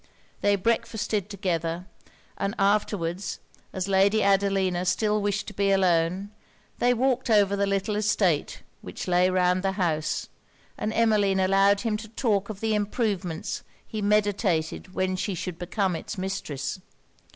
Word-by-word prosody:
They 205 0 +3
breakfasted 215 -1 -1
together; 175 -3 -2 0.5
and 200 +3 -2
afterwards, 195 -3 0 0.3
as 190 0 -3
Lady 200 +2 +3
Adelina 195 -2 +2
still 210 +3 +1
wished 205 0 -1
to - - -11
be 200 0 +1
alone, 185 0 +2 0.5
they 245 - +4
walked 255 +1 +1
over 200 -2 +4
the 200 0 +1
little 195 +2 0
estate 205 -6 +1 0.2
which - - -7
lay 180 0 +3
round 180 0 +2
the 195 0 0
house, 160 -5 -1 0.5
and 215 - -2
Emmeline 210 -4 +2
allowed 195 +1 +4
him 225 -3 0
to 220 +1 -9
talk 210 -3 0
of 205 -2 -7
the 220 -1 +1
improvements 205 -5 -2 0.2
he 215 - -5
meditated 200 -5 0
when 185 0 0
she 190 +1 -2
should 175 0 -5
become 185 +1 -1
it's 205 - -6
mistress. 185 -6 -4
195 Hz, 140 wpm, -26 LUFS, 185-210 Hz, 0.5 s, they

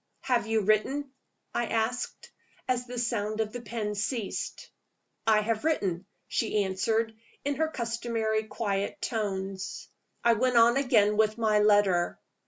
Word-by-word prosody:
"Have 240 -4 +1
you 220 -1 +2
written?" 235 +8 +1 0.4
I 240 - 0
asked, 230 +2 -2 0.4
as 250 -1 0
the 245 0 -6
sound 220 -3 -1
of 220 -1 -1
the 245 - -5
pen 215 -2 -3
ceased. 220 +1 -3 0.6
"I 215 -1 +5
have 220 +2 -1
written," 195 - 0 0.2
she 215 -2 +1
answered, 220 +4 0 0.3
in 285 -1 0
her 320 +1 +2
customary 230 -4 -1
quiet 200 -3 -2
tones. 195 -3 -3 0.3
I 235 - +6
went 250 +2 +2
on 235 +1 +6
again 210 -6 +3
with 215 0 +3
my 215 -2 +3
letter. 205 -4 +3
220 Hz, 140 wpm, -28 LUFS, 210-240 Hz, 0.6 s, I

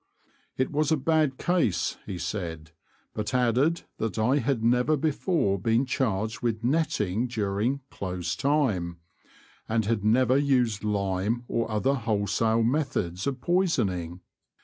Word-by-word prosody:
It 130 - 0
was 150 +1 +1
a 160 - +4
bad 150 -1 +1
case 175 - 0
he 95 - -4
said, 85 -3 -5 0.4
but 105 +4 -3
added 125 +7 +2 0.2
that 110 0 -2
I 120 +6 +3
had 125 -2 -1
never 125 +6 +3
before 150 - 0
been 115 +6 +2
charged 110 -5 -1
with 115 -2 -1
netting 120 - 0
during 110 +3 -1
'' - - -49
close 90 -2 -3
time," 110 - 0 0.7
and 110 -1 +1
had 110 -1 0
never 125 +4 +4
used 125 -7 +1
lime 100 +2 -1
or 115 -1 -1
other 110 +6 +1
wholesale 110 -1 +1
methods 115 - -1
of 135 -2 -3
pois 180 +2 +2
oning. 90 -2 -2
115 Hz, 140 wpm, -27 LUFS, 100-135 Hz, 0.7 s, a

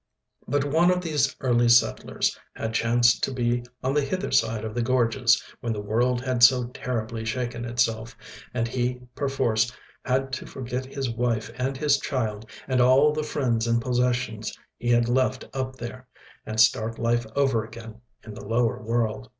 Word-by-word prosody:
But 145 +1 +1
one 160 +5 +3
of 180 0 +2
these 150 -5 0
early 120 -2 +3
settlers 120 0 +2 0.2
had 110 0 -4
chanced 120 +1 +3
to - - -5
be 120 -1 0 0.2
on 130 +1 0
the 150 - +3
hither 185 +8 -3
side 110 -1 +1
of 110 - -5
the 120 - -1
gorges 120 -1 +2 0.2
when 115 -2 -2
the 105 - -4
world 120 +4 0
had 130 -1 -2
so 125 -1 +6
terribly 115 -3 -4
shaken 120 +1 -3
itself, 115 -1 -1 0.3
and 115 -2 -1
he 125 +1 -2 0.2
perforce 125 -5 0 0.3
had 135 +1 -1
to - - -4
forget 130 0 -5
his 135 -2 -3
wife 115 -1 -1
and 130 +1 -2
his 145 0 +2
child 110 -5 -3 0.2
and 130 -2 +2
all 135 +4 +5
the 155 - -1
friends 120 -6 -1
and 115 0 +2
possessions 125 -2 -1 0.2
he 120 - -4
had 120 -1 +4
left 130 +1 +1
up 130 -1 -3
there, 130 +1 -8 0.4
and 110 0 -3
start 110 0 +3
life 120 0 0
over 135 -6 +2
again 115 0 -11 0.2
in 110 - -9
the - - -9
lower 115 +1 0
world. 115 +1 -1
120 Hz, 175 wpm, -25 LUFS, 115-130 Hz, 0.4 s, so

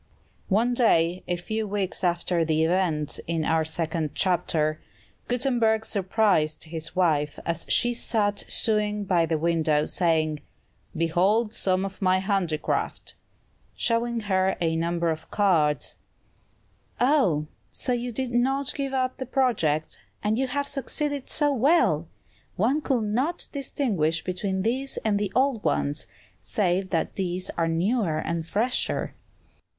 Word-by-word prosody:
One 225 +5 +2
day, 180 -7 +3
a 175 - 0
few 215 +5 -3
weeks 195 -2 -3
after 175 -1 +1
the 160 0 +1
events 160 -4 0
in 165 -1 -1
our 160 0 +2
second 160 -1 -2
chapter, 160 -4 +1 0.5
Gutenberg 235 -3 +1
surprised 190 -6 +1
his 160 +1 -5
wife 150 -5 +1
as 170 -1 -2
she 240 0 +3
sat 210 -3 0
sewing 210 -2 0
by 175 -4 +2
the 160 0 0
window, 155 -2 +1
saying, 155 -4 +1 0.6
"Behold 190 +7 +2
some 185 -2 +1
of 195 0 -8
my 185 -1 +3
handicraft!" 185 -5 -1 0.6
showing 235 0 0
her 190 -2 +1
a 165 -2 +1
number 170 0 0
of 160 0 -6
cards. 165 -8 +1 1.0
"Ah, 265 - +4
and 150 +1 -3 0.2
so 250 - -1
you 245 0 -2
did 255 +2 -3
not 270 +3 +1
give 275 -1 -3
up 255 -1 0
the 260 - -5
project? 200 - 0 0.2
and 210 +1 +1
you 265 - +1
have 285 +3 -1
succeeded 285 0 -3
so 290 -2 +2
well! 250 - +3 0.5
One 255 +10 +1
could 260 -6 0
not 250 +11 -1
distinguish 210 - -1
between 190 +1 -2
these 260 +4 -2
and 205 -2 +2
the 205 -2 -2
old 260 -4 +2
ones, 145 -1 -1 0.3
save 185 -2 0
that 165 -3 -1
these 185 -1 -2
are 165 -1 -1
newer 170 +1 +1
and 165 +1 -2
fresher." 225 +8 -1
190 Hz, 135 wpm, -26 LUFS, 165-235 Hz, 1.0 s, Ah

